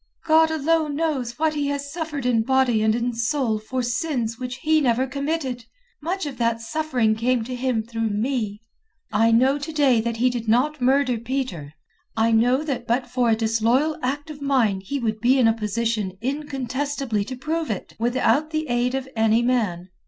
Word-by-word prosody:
"God 320 0 +5
alone 315 -1 +1
knows 275 -7 -2
what 315 0 +1
he 290 -2 -1
has 280 0 -3
suffered 310 -5 -4
in 240 -3 +3
body 255 -2 +2
and 220 0 +3
in 240 +1 -1
soul 230 -1 0
for 255 +4 -3
sins 240 -2 -2
which 250 -1 -4
he 310 0 +3
never 255 -1 +2
committed. 275 -2 -3 0.4
Much 360 +3 -2
of 270 -4 -6
that 230 -1 +1
suffering 245 -2 0
came 235 +2 0
to 255 +3 -6
him 250 -3 -1
through 225 0 -2
me. 215 -1 -2 0.5
I 220 +2 +3
know 260 +5 +4
to 295 +3 -5
day 275 -7 +3
that 230 0 -3
he 250 +2 +2
did 235 -2 -4
not 260 +6 +2
murder 255 -1 +2
Peter. 225 - -4 0.4
I 225 +1 +3
know 245 +5 +3
that 255 -6 -3
but 245 +2 +1
for 250 -2 +2
a 225 - +4
disloyal 230 +7 +1
act 290 +4 -3
of 290 -1 -10
mine 245 -9 +1
he 280 +9 -3
would 220 -4 -2
be 250 +4 +3
in 250 -3 +4
a 225 - +4
position 220 -2 -2
incontestably 270 -2 -2
to 255 - -6
prove 315 +4 -3
it 210 - -5
without 255 +6 +2
the 310 -2 -3
aid 240 +1 +1
of 265 0 -3
any 225 +1 +3
man. 205 -8 0
250 Hz, 190 wpm, -23 LUFS, 225-285 Hz, 0.5 s, God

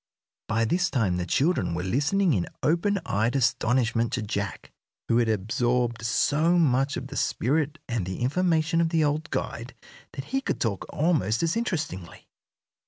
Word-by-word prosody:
By 115 +1 +1
this 175 - +1
time 105 - 0
the 90 0 -3
children 135 - +1
were 90 - -3
listening 145 - +1
in 90 -6 0 0.2
open 175 +6 +2
eyed 110 +6 0
astonishment 120 -2 +1
to 120 - -1
Jack, 100 -3 -4 0.4
who 115 - +3
had 115 -2 +2
absorbed 120 +3 0
so 150 +9 +2
much 140 -3 +2
of 130 +1 -6
the 140 - -8
spirit 150 +4 0
and 115 -5 -1
the 95 +3 -5
information 165 +4 +1
of 165 - +1
the 165 -1 +2
old 150 +1 -1
guide 120 +3 -4 0.4
that 135 -1 -6
he 270 - +2
could - - -2
talk 105 -5 -2
almost 145 - +1
as 165 0 +1
interestingly. 160 - -4
130 Hz, 165 wpm, -26 LUFS, 115-160 Hz, 0.4 s, who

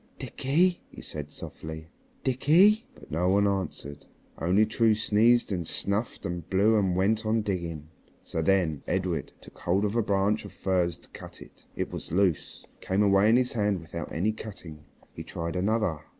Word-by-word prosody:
"Dickie," 175 +7 +1
he - - -13
said 75 -1 -5
softly, 80 0 -8 0.4
"Dickie." 170 - +4
But 75 -3 -16
no 85 +4 +1
one 100 +1 +3
answered. 80 -7 -4 0.4
Only 90 +7 +3
True 110 0 +2
sneezed 110 +2 +3
and 90 -4 -2
snuffed 100 +4 -2
and 85 -2 -5
blew 100 +4 +3
and 95 -3 +1
went 105 +4 +1
on 110 0 +1
digging. 85 -6 -4 0.4
So 80 - -3
then 80 -4 +1
Edred 90 -2 -1
took - - -15
hold 95 +4 +1
of 105 +2 -2
a 120 - +3
branch 100 +1 +1
of 100 - -10
furze 90 -3 0
to - - -18
cut - - -11
it, - - -16
and - - 0
it - - -11
was - - -6
loose 90 -3 0
and - - -33
came 95 +2 +1
away 100 +1 +4
in 115 - +5
his 125 0 +2
hand 105 -4 0
without 80 -1 -7
any 95 +7 0
cutting. 90 -9 -10 0.3
He - - -7
tried 85 +1 -5
another. 100 -3 0
95 Hz, 180 wpm, -27 LUFS, 85-110 Hz, 0.4 s, in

